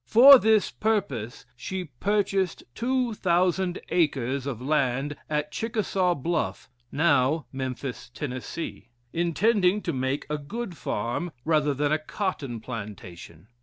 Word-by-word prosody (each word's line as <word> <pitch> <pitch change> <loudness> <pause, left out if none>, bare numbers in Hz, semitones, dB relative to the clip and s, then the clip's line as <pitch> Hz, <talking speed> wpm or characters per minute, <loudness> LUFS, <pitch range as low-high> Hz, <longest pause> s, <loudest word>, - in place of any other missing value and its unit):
For 265 +4 +10
this 220 -2 +3
purpose 140 - -2
she 185 +9 -4
purchased 195 +5 0
two 250 0 0
thousand 180 -1 +1
acres 140 -5 0
of 130 -5 -3
land 135 0 0
at 150 0 -1
Chickasaw 195 -5 0
Bluffe, 160 -2 -2 0.2
(now 145 -1 +2
Memphis, 130 -1 -5
Tennessee), 130 -2 -6 0.3
intending 180 +3 +2
to 170 - -2
make 130 +2 -1
a 150 0 -2
good 190 +6 -5
farm 140 +4 -3
rather 150 -3 +2
than 145 +2 0
a 155 - +2
cotton 155 - -3
plantation. 100 -8 -8
155 Hz, 120 wpm, -26 LUFS, 130-190 Hz, 0.3 s, For